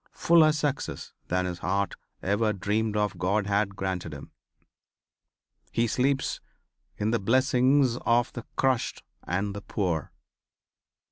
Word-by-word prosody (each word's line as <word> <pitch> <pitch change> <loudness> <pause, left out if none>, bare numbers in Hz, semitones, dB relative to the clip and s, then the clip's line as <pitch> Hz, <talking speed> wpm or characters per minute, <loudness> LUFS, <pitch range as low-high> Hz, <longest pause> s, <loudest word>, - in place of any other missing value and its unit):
Fuller 160 -2 +5
success 150 -2 -3
than 90 +1 0
his 90 -1 -4
heart 100 +3 0 0.3
ever 105 +3 +1
dreamed 105 +2 -1
of 105 -2 -1
God 100 +3 +1
had 100 0 0
granted 95 -5 -3
him. 70 - -10 1.4
He 115 - +2
sleeps 135 +4 0 0.6
in 105 +2 0
the 115 - +1
blessings 130 +3 +3
of 120 0 +1
the 120 - -7
crushed 130 -3 0 0.2
and 100 +3 -1
the 100 - -5
poor. 90 -8 -2
105 Hz, 125 wpm, -27 LUFS, 95-125 Hz, 1.4 s, Fuller